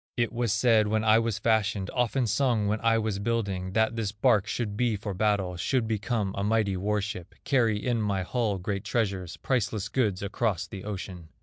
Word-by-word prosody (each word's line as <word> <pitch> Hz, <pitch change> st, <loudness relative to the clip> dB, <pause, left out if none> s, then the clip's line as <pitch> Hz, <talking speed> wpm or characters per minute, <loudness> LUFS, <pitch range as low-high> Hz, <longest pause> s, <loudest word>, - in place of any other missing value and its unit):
It 120 Hz, -1 st, 0 dB
was 120 Hz, -2 st, 0 dB
said 110 Hz, 0 st, +4 dB
when 110 Hz, +1 st, +1 dB
I 110 Hz, 0 st, +5 dB
was 115 Hz, -2 st, -1 dB
fashioned, 105 Hz, -3 st, +1 dB
Often 125 Hz, +1 st, +1 dB
sung 115 Hz, 0 st, +1 dB
when 105 Hz, +1 st, 0 dB
I 115 Hz, 0 st, +3 dB
was 110 Hz, -3 st, -1 dB
building, 100 Hz, -4 st, -2 dB
That 110 Hz, +1 st, +2 dB
this 110 Hz, -3 st, -2 dB
bark 105 Hz, -1 st, +2 dB
should 110 Hz, -2 st, -2 dB
be 120 Hz, 0 st, +1 dB
for 100 Hz, 0 st, -4 dB
battle, 95 Hz, -2 st, 0 dB
Should 120 Hz, +5 st, 0 dB
become 110 Hz, -2 st, -1 dB
a 100 Hz, -, -2 dB
mighty 105 Hz, -2 st, +1 dB
war 105 Hz, +3 st, 0 dB
ship, 95 Hz, -4 st, -6 dB
Carry 115 Hz, -6 st, +2 dB
in 115 Hz, +2 st, -1 dB
my 100 Hz, -3 st, 0 dB
hull 110 Hz, -1 st, -1 dB
great 100 Hz, +1 st, -3 dB
treasures, 95 Hz, -7 st, -2 dB
Priceless 110 Hz, -6 st, -1 dB
goods 105 Hz, -8 st, 0 dB
across 100 Hz, -2 st, -1 dB
the 95 Hz, -1 st, -9 dB
ocean. 95 Hz, -5 st, -6 dB
105 Hz, 195 wpm, -27 LUFS, 100-115 Hz, -, I